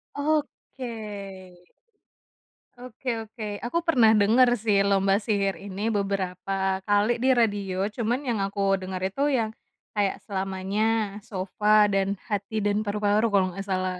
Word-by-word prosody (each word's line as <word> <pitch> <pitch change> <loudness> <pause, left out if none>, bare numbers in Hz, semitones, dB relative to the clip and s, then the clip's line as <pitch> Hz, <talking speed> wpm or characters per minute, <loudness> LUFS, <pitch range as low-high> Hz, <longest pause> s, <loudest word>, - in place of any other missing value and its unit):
Oke. 285 -4 -2 1.9
Oke 250 +1 -7 0.2
oke. 225 0 -9 0.2
Aku 335 +6 -1
pernah 240 -10 +5
dengar 220 +5 +5
sih 210 -3 +1
Lomba 195 0 +3
Sihir 200 -2 -1
ini 200 +3 -3
beberapa 195 -1 -1
kali 210 +4 +2
di 260 +2 +2
radio, 200 -5 0
cuman 235 +3 -1
yang 235 -5 -1
aku 195 -1 0
dengar 185 0 -5
itu 195 +9 -2
yang 230 -6 +1 0.4
kayak, 205 -2 0
"Selamanya," 200 +2 -1
"Sofa" 210 +1 +2
dan 195 0 +1 0.2
"Hati 205 +1 -2
dan 205 0 +1
Paru-Paru" 210 +1 +1
kalau 200 -3 +3
nggak 195 +2 -7
salah. 185 -1 -1
205 Hz, 130 wpm, -26 LUFS, 195-225 Hz, 1.9 s, pernah